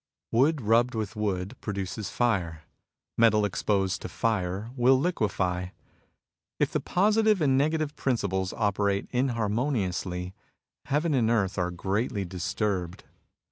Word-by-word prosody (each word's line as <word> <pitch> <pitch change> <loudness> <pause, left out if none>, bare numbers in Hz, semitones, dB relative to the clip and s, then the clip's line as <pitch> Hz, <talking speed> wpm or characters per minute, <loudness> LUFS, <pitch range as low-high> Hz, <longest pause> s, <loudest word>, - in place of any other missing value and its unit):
Wood 140 +5 +3
rubbed 115 +3 +3
with 110 -1 -3
wood 100 0 -2
produces 100 0 -4
fire. 90 -10 0 0.6
Metal 110 -2 +5
exposed 95 0 0
to - - -6
fire 105 0 -1
will 130 +1 +4
liquefy. 95 - 0 0.9
If - - +1
the - - 0
Positive 215 +2 +2
and 140 -4 +3
Negative 155 +1 +1
principles 95 -7 -1
operate 100 -2 0
inharmoniously, 105 -7 -1 0.5
heaven 150 +3 +1
and 120 -5 +2
earth 100 -4 +1
are 90 0 0
greatly 100 +3 -2
disturbed. 95 0 -3
105 Hz, 115 wpm, -27 LUFS, 95-125 Hz, 0.9 s, Metal